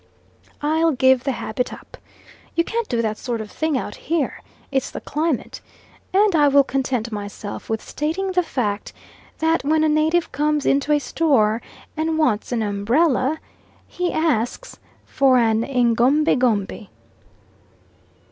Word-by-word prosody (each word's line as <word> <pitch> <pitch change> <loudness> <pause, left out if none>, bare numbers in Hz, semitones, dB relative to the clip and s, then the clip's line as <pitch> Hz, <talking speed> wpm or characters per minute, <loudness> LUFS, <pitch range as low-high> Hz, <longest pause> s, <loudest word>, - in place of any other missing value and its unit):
I'll 320 +2 +2
give 260 -1 +3
the 275 - +1
habit 240 +1 -3
up. - - -11 0.6
"You 335 - +3
can't 460 +4 -3
do 235 -2 0
that 215 -1 -2
sort 240 -2 -3
of 215 -1 -7
thing 315 -3 -1
out 205 - -4
here 320 +3 -2 0.3
It's 270 -2 0
the - - -6
climate," 305 -3 -2 0.5
and 395 -1 +3
I 295 -2 +5
will 280 0 +5
content 260 -4 -2
myself 205 0 -7
with 220 -1 -2
stating 345 +6 -2
the 365 -1 +2
fact, 215 - -3 0.4
that 320 -1 +1
when 310 +2 +2
a - - +4
native 315 +3 +2
comes 295 +1 0
into 280 +2 +2
a 295 - +5
store 255 -8 +1 0.3
and 315 0 -1
wants 250 -10 +1
an 235 -2 0
umbrella, 255 +8 +1 0.5
he 360 0 -2
asks 270 -8 -1 0.3
for 265 -2 +3
an 225 -2 +3
egombie 250 +4 +3
gombie. 220 -4 -1
275 Hz, 145 wpm, -21 LUFS, 230-315 Hz, 0.6 s, I